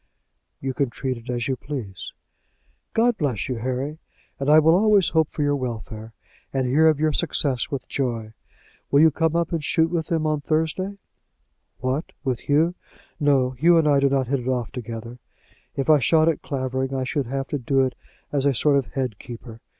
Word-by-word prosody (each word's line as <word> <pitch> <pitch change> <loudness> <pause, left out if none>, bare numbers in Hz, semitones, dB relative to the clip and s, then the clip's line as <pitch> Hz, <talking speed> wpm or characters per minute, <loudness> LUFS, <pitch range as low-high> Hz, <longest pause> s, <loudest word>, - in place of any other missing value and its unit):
"You 135 -1 -3
can 140 0 0
treat 130 +1 -3
it 115 +2 -12
as 120 -1 -1
you 135 - 0
please." 120 - -6 0.8
"God 235 0 +2
bless 130 - -1
you, 125 - -3
Harry; 130 +6 -3 0.4
and 140 +1 -1
I 155 - +8
will 160 +1 +6
always 205 0 +4
hope 160 -2 +2
for 150 - -2
your 145 0 +2
welfare, 115 -3 -5 0.4
and 135 -1 0
hear 150 +6 +4
of 155 -2 +3
your 155 0 +2
success 140 -6 0
with 140 -4 -5
joy. 115 -5 -3 0.6
Will 140 - +5
you 160 0 +6
come 165 +1 0
up 170 -1 0
and 165 -3 -2
shoot 160 +3 +2
with 165 -2 -1
them 160 -2 0
on 155 -1 0
Thursday?" 160 +6 -1 0.8
"What, 130 +5 -2
with 130 -4 -1
Hugh? 160 +4 +3 0.5
No; 140 -4 +3
Hugh 165 +7 +4
and 160 -2 +3
I 145 -2 +4
do 140 0 +3
not 135 -1 +1
hit 135 +2 0
it 125 - -7
off 125 -3 -1
together. 120 0 -7 0.6
If 135 - -2
I 155 -2 +6
shot 155 +4 +3
at 165 - +1
Clavering 130 -1 -2
I 130 - -1
should 130 0 -2
have 135 +2 -2
to 145 - -2
do 135 +2 +2
it 130 -1 +1 0.4
as 140 -1 +1
a 140 - +2
sort 145 +3 +3
of 135 - -1
head 130 -6 -2
keeper. 115 -1 -10
140 Hz, 200 wpm, -23 LUFS, 125-155 Hz, 0.8 s, I